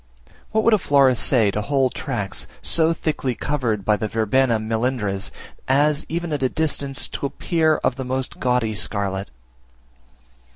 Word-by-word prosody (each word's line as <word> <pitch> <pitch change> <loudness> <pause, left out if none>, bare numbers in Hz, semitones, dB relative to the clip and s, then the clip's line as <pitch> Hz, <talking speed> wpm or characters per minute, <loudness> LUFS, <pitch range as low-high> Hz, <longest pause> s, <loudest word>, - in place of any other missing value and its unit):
What 220 0 +1
would 230 - +4
a 215 - +4
florist 135 -6 +3
say 115 -7 +3
to 105 - -2
whole 135 +2 +1
tracts, 115 -8 -4 0.2
so 160 0 +3
thickly 150 -6 -2
covered 115 -10 -1
by 105 -1 +3
the 110 - -2
Verbena 115 +3 +2
melindres, 110 -3 -1 0.4
as, 145 +3 +2
even 170 -1 -2
at 145 - -2
a 130 - +2
distance, 140 -4 -2
to 140 - -3
appear 160 +1 +1
of 130 - +1
the 130 - -3
most 130 0 -3
gaudy 125 -3 +1
scarlet? 100 0 -1
130 Hz, 155 wpm, -22 LUFS, 110-145 Hz, 0.4 s, would